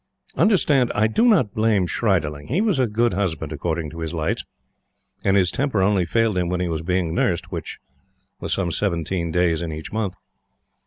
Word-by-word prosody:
Understand, 150 - +3
I 105 - +3
do 165 - +2
not 160 - +3
blame 110 -4 +2
Schriederling. 80 -8 -1
He 155 - 0
was 205 -9 +1
a 130 - +3
good 115 +1 +1
husband 80 -5 -2
according 80 0 -3
to 85 - -9
his 80 0 -4
lights, 80 -1 -1 0.8
and 100 0 +3
his 90 -2 +3
temper 135 -9 0
only 95 -3 +2
failed 115 0 +1
him 90 -1 -1
when 90 0 -1
he 90 - 0
was 80 -2 -2
being 90 -1 -1
nursed. 85 0 0
Which - - -5 0.6
was - - -4
some 90 -3 0
seventeen 85 -2 -1
days 85 -1 +1
in 85 -2 -3
each 80 0 -7
month. 105 -4 -2
90 Hz, 190 wpm, -22 LUFS, 85-110 Hz, 0.8 s, Understand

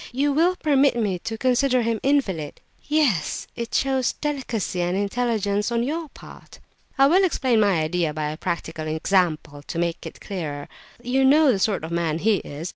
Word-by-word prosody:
You 280 +3 +1
will 340 +5 +3
permit 285 -6 +2
me 205 -6 -1
to 225 +5 -5
consider 255 +1 +2
him 230 0 0
an 275 +2 +4
invalid?" 180 - -2 0.3
"Yes, 285 - 0
it 235 -1 -5
shows 265 -2 +1
delicacy 250 -11 -3
and 175 +2 0
intelligence 205 0 -1
on 235 0 +1
your 315 +4 -3
part." - - -14 0.4
"I 270 - +6
will 360 +7 +4
explain 260 -10 +2
my 200 -6 +3
idea 165 0 0
by 150 0 -3
a 155 - -7
practical 160 -2 -4
example, 160 -3 0
to 145 - -7
make 170 0 -2
it - - -11
clearer. 150 -8 -5 0.4
You 260 +2 +1
know 290 +1 +5
the 200 - 0
sort 195 -3 0
of 160 - -6
man 170 -2 -1
he 210 +4 +2
is. 155 +3 -7
220 Hz, 185 wpm, -23 LUFS, 170-270 Hz, 0.4 s, I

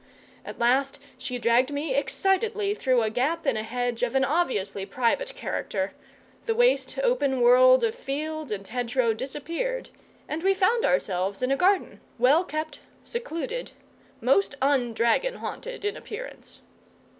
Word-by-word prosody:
At - - -8
last 265 +3 +2 0.2
she 250 - -4
dragged 240 +3 +3
me 290 0 -2
excitedly 400 - +1
through 255 - +2
a 215 - -1
gap 295 +8 -1
in 270 -4 +2
a 215 - -1
hedge 245 +1 -3
of 250 +1 0
an 265 0 +4
obviously 255 - -1
private 255 - -1
character; 195 - -3 0.5
the 455 - +1
waste, 485 +1 +2
open 285 - +1
world 255 +1 +6
of 225 -1 +1
field 305 0 -4
and 195 -2 -4
hedge 245 0 -4
row 235 -4 +3
disappeared, 335 - -4 0.4
and 315 - -3
we 385 +2 +3
found 455 +5 +2
ourselves 195 - 0
in 255 - +1
a - - +4
garden, 375 +5 +1 0.2
well 270 +8 +4
kept, 310 -1 -5 0.2
secluded, 475 +1 -5 0.5
most 275 - +2
un 265 -3 +2
dragon 485 - +2
haunted - - -6
in 415 - -1
appearance. - - -9
275 Hz, 150 wpm, -26 LUFS, 245-390 Hz, 0.5 s, world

